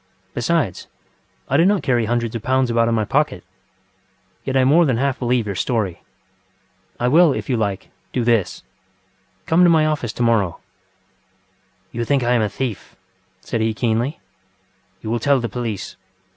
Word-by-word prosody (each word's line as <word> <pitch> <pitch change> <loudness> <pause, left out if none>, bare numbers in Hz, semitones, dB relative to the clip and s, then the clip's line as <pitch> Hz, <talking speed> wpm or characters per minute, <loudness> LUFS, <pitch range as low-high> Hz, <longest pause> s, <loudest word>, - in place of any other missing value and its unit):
Besides, - - -1 0.6
I 140 - +2
do 165 - +5
not 200 -1 +2
carry 120 -4 +1
hundreds 120 0 -1
of 115 - -3
pounds 130 +1 +1
about 115 0 +2
in 115 - +1
my 110 -1 0
pocket. - - 0 1.0
Yet 135 0 -1
I 130 - +4
more 150 +7 +5
than 130 -7 +1
half 135 +1 0
believe 120 -2 +1
your 100 - -3
story. 100 -3 -2 1.0
I 120 - +1
will, 160 +3 +5
if - - -4
you - - +2
like, 100 -4 -2 0.2
do 125 - -1
this: 115 -5 0 0.8
come 165 +3 +4
to 175 - +6
my 160 -2 +4
office 150 -7 -1
to 120 - -2
morrow... 110 -7 +1 1.3
.ŌĆØ 120 - -5
ŌĆ£You 115 - -3
think 140 -3 +2
I 120 +1 +2
am 120 - +3
a 105 - 0
thief! 110 -2 -5 0.5
ŌĆØ - - -25
said 115 - -2
he 110 0 0
keenly. 115 +3 -1 0.8
ŌĆ£You 110 - -4
will 120 - 0
tell 140 +3 +3
the 120 - -2
police. 115 -5 -5
120 Hz, 180 wpm, -20 LUFS, 110-135 Hz, 1.3 s, to